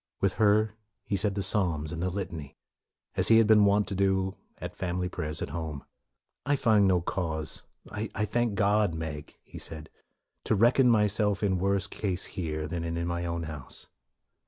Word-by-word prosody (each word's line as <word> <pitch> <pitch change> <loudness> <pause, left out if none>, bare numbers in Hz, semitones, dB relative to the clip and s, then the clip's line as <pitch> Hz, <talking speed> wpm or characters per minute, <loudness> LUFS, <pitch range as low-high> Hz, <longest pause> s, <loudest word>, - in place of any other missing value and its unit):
With 95 -2 +1
her 105 0 +4 0.3
he 100 - -2
said 100 0 +1
the 100 - -1
psalms 85 -7 +1
and 85 - -4
the 90 - 0
litany, 85 -7 -6 0.6
as - - +2
he 115 - +7
had 115 - +6
been 105 -1 +6
wont 100 +1 +3
to - - -3
do 95 0 +1 0.2
at - - -7
family 90 0 -2
prayers 75 -3 -4
at - - -5
home. 80 -2 -5 0.3
" - - -58 0.2
I 145 - +2
find 110 -6 +4
no 90 -2 +3
cause, 80 -3 -3 0.3
I 105 0 -2
thank 115 0 0
God, 100 -2 +2
Meg," 80 -2 -6
he - - -10
said, 80 -1 -7 0.3
" - - -55
to 110 - +2
reckon 120 +4 +5
myself 105 -2 +2
in 95 -3 +1
worse 100 +1 +1
case 95 -2 -2
here, 80 -3 -3
than 85 +1 -3
in 85 0 -2
mine 85 0 -2
own 85 0 -2
house.'' 75 -4 -8
95 Hz, 185 wpm, -28 LUFS, 85-105 Hz, 0.6 s, he